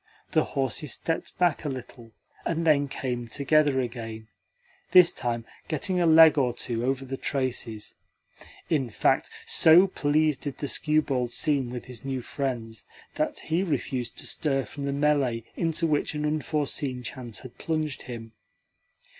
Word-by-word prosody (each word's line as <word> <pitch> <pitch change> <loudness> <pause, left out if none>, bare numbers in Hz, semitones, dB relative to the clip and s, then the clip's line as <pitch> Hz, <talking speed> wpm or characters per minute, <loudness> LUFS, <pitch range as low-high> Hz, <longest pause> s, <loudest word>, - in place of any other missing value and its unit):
The - - +3
horses 135 0 0
stepped 165 - -3
back 175 -4 +2
a 150 - -2
little, 120 -3 -8 0.3
and 165 0 -1
then 145 -3 +4
came 125 -3 -4
together 145 +2 +2
again 115 -2 -6 0.6
this 180 -2 +8
time 120 -2 -3 0.2
getting 180 +4 0
a 170 - +3
leg 160 -1 +8
or 125 -3 +1
two 120 -1 -2
over 135 +1 -1
the 135 +1 -5
traces. 125 -7 -2 0.7
In 140 -7 0
fact, 100 - +1 0.2
so 165 +4 +6
pleased 155 -4 +1
did 145 -3 -5
the 145 - -3
skewbald 140 -6 +1
seem 140 -5 +1
with 125 0 -6
his 125 -3 -9
new 135 -2 -3
friends 115 -7 -4 0.3
that - - -1
he 165 +3 0
refused 130 -8 -2
to - - -3
stir 135 -4 0
from 140 - -7
the 140 - -1
melee 140 -5 +1
into 165 0 0
which 150 -1 0
an 150 0 -1
unforeseen 150 -4 -1
chance 120 -2 -6
had 130 - -12
plunged 155 -3 -2
him. 115 -2 -8
135 Hz, 155 wpm, -27 LUFS, 125-155 Hz, 0.7 s, this